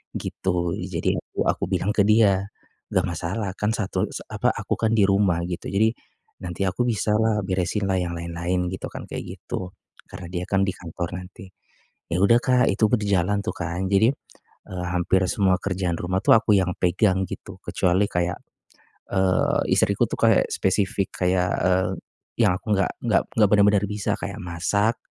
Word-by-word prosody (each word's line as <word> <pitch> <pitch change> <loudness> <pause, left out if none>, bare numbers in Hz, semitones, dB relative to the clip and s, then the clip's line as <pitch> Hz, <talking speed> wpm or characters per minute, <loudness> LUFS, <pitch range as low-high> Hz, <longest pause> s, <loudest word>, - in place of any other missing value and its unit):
gitu. 85 -2 -2
Jadi - - -2
aku - - -3
aku - - 0
bilang 95 +2 +1
ke 100 - +4
dia, 100 -2 +3 0.4
"Enggak - - +1
masalah, 95 +5 -3
kan 105 +1 0
satu 110 -4 -1
sa - - -8
apa, - - +1
aku - - -3
kan 110 -1 0
di 105 -4 +4
rumah," 95 -3 +2
gitu, 90 +1 -5
"jadi 110 +3 +3 0.5
nanti 90 +2 -2
aku 95 +7 0
bisalah 110 -1 +1
beresinlah 95 +1 0
yang 90 -1 -2
lain-lain," 85 +2 -2
gitu 95 - -5
kan - - -8
kayak - - -7
gitu, 90 0 -5 0.4
karena 90 - -9
dia 90 -1 -3
kan 95 0 +2
di - - +1
kantor 85 +1 -6
nanti. 90 +1 -10 0.6
Ya 85 - 0
udah 115 +4 +6
Kak 125 -1 +3
itu 110 +3 +2
berjalan 100 -4 +1
tuh - - -2
kan. 85 +2 -3
Jadi, 105 +4 +5 0.6
eee, 90 -1 -5
hampir 95 +1 +2
semua 95 -3 +2
kerjaan 95 -3 -2
rumah 90 +1 -1
tuh - - +7
aku 110 -1 +2
yang 95 -1 +1
pegang 95 +1 +2
gitu. - - -8
Kecuali 90 +3 +1
kayak, 90 -1 -1 0.8
eee, 95 -1 +2
istriku - - +2
tuh - - -4
kayak - - +4
spesifik 100 +1 0
kayak, 90 0 +2 0.2
eee, 95 0 +2 0.6
yang 90 - +3
aku 105 - -3
enggak 95 -1 +1 0.2
enggak 110 - +3 0.3
bener-bener 105 -1 +4
bisa 105 -1 -1
kayak - - -5
masak, 100 +6 0
95 Hz, 165 wpm, -24 LUFS, 90-105 Hz, 0.8 s, tuh